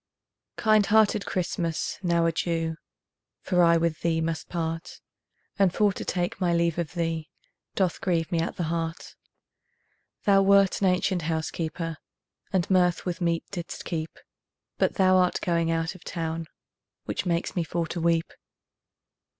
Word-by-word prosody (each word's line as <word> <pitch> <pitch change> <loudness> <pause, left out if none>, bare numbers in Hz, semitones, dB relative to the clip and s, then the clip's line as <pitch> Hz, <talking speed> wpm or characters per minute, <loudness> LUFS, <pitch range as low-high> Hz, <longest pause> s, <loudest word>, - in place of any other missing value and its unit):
Kind 215 -2 +4
hearted 215 -1 +3
Christmas, 170 -2 -2
now 170 -2 +2
adieu, 165 -1 -1 0.7
For 180 -2 +2
I 170 -1 +6
with 165 -1 -1
thee 165 -1 +1
must 160 -1 -3
part, 165 -1 -4 0.6
And 195 -2 +5
for 205 +1 +2
to - - -6
take 175 +1 -2
my 175 -2 +2
leave 170 0 +1
of 170 0 -4
thee 165 -2 -2 0.5
Doth 185 -4 0
grieve 170 -2 0
me 170 - +1
at 165 - -2
the 175 - -2
heart; 165 0 -3 1.1
Thou 195 -1 +5
wert 195 0 +4
an 195 - +4
ancient 180 0 +1
housekeeper, 160 0 -3 0.5
And 185 -3 +1
mirth 180 -2 +2
with 180 0 -3
meat 170 -1 +1
didst 175 -3 -6
keep, 160 -2 -4 0.6
But - - +2
thou 185 -1 +5
art 180 -1 +2
going 170 -2 0
out 165 +1 0
of 185 -2 -15
town, 165 -1 -4 0.6
Which - - -3
makes 170 0 -1
me 175 - +1
for 165 +1 -2
to 170 - -3
weep. 165 0 +1
170 Hz, 150 wpm, -26 LUFS, 165-185 Hz, 1.1 s, I